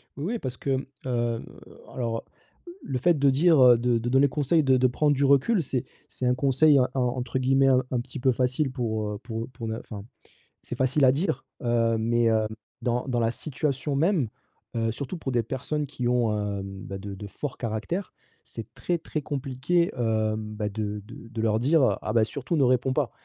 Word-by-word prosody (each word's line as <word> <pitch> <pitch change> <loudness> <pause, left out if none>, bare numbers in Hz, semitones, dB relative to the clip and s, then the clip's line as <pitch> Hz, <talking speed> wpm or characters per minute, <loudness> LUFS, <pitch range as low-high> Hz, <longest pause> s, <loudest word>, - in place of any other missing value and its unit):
Oui 195 +12 -3
parce 130 - -5
que, 135 -1 0
mmh, 135 - -5 0.2
heu, 120 -2 -1 0.5
alors, 115 -3 -2 0.4
heu, - - -8
le 130 - -2
fait 165 +6 +3
de 140 0 +5
dire, 155 +2 +4
heu, 125 -2 +8
de 120 0 +1
de 115 +1 -2
donner 135 +3 +5
conseil 150 +3 +2
de 130 -2 +4
de 130 0 +4
prendre 145 +4 +2
du 140 - 0
recul 140 - +4
c'est 130 -4 -2 0.3
c'est 130 - -4
«un 125 - +4
conseil» 140 +2 +4
en 125 - +3
entre 125 -1 -1
guillemets, 135 +1 +3
un 130 -1 +4
un 125 - +1
petit 130 +3 -7
peu 130 +1 +3
facile 130 +3 0
pour, 110 -4 -2
heu, 105 - -4
pour 115 0 -5
pour 125 -3 -7
ne 110 0 -3
enfin, 105 -3 -9 0.6
c'est - - -6
facile 130 +3 +2
à 130 - +7
dire, 155 +9 -1 0.2
heu, 115 -1 +2
mais, 115 +1 +1
hem, 110 -1 +3 0.3
dans 120 +1 -1
dans 125 -2 0
la 115 -1 +2
situation 140 +1 -2
même, 160 - +2 0.5
heu, 115 -1 0
surtout 140 +8 -5
pour 140 -5 -4
des 120 -1 +2
personnes 145 +6 -3
qui 130 -3 -4
ont, 120 -3 +2
hem, 100 -1 -4
bah, 95 - -5
de 100 +1 -7
de 100 +2 -8
forts 135 +6 -6
caractères 115 - -3 0.3
c'est - - -9
très 175 - -1
très 155 -1 -4
compliqué, 140 +5 0
hem, 110 -2 -1
bah, 105 -1 -2
de 105 0 -4
de 110 - -11
de 115 -1 -4
leur 110 -1 +2
dire: 150 +6 +3 0.2
«Ah - - -3
bah, 115 -2 +4
surtout 140 +8 -3
ne 145 - +3
réponds 130 +1 +2
pas». 140 -5 0
125 Hz, 210 wpm, -26 LUFS, 115-140 Hz, 0.6 s, heu